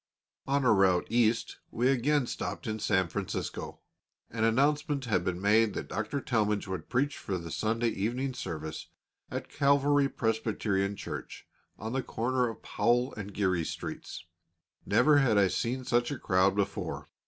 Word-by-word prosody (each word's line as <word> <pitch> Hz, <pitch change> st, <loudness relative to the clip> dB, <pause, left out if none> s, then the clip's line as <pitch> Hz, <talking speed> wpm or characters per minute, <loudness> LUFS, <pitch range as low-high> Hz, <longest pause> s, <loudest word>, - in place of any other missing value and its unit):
On 140 Hz, 0 st, +1 dB
our 115 Hz, -, +6 dB
route 95 Hz, -3 st, +3 dB
East 115 Hz, -1 st, +2 dB
we 120 Hz, +2 st, 0 dB
again 135 Hz, +2 st, +2 dB
stopped -, -, -4 dB
in 110 Hz, 0 st, -3 dB
San 95 Hz, -4 st, +2 dB
Francisco. 85 Hz, -, -4 dB, 0.5 s
An 110 Hz, 0 st, -2 dB
announcement 140 Hz, +4 st, +2 dB
had 100 Hz, -6 st, +1 dB
been 90 Hz, -1 st, -2 dB
made 105 Hz, +1 st, +3 dB
that -, -, -5 dB
Dr. 110 Hz, +8 st, -2 dB
Talmage 105 Hz, -6 st, 0 dB
would 95 Hz, -4 st, -5 dB
preach 135 Hz, +4 st, 0 dB
for 95 Hz, -, -3 dB
the 85 Hz, -2 st, -7 dB
Sunday 115 Hz, +4 st, 0 dB
evening 120 Hz, +7 st, -2 dB
service 80 Hz, -8 st, -5 dB, 0.4 s
at -, -, -4 dB
Calvary 140 Hz, 0 st, +3 dB
Presbyterian 110 Hz, -4 st, -1 dB
Church, -, -, -7 dB, 0.3 s
on 110 Hz, +3 st, -5 dB
the 135 Hz, -, 0 dB
corner 125 Hz, +1 st, 0 dB
of 115 Hz, -, -9 dB
Powell 120 Hz, +4 st, +1 dB
and 105 Hz, -1 st, -7 dB
Geary 95 Hz, -4 st, +1 dB
Streets. 80 Hz, -, -6 dB, 0.6 s
Never 150 Hz, -1 st, +5 dB
had 120 Hz, -7 st, +3 dB
I 100 Hz, -1 st, +5 dB
seen 125 Hz, +7 st, -2 dB
such 120 Hz, 0 st, +2 dB
a 145 Hz, -, -3 dB
crowd 95 Hz, -1 st, +2 dB
before. 100 Hz, -1 st, -2 dB
115 Hz, 155 wpm, -30 LUFS, 100-130 Hz, 0.6 s, our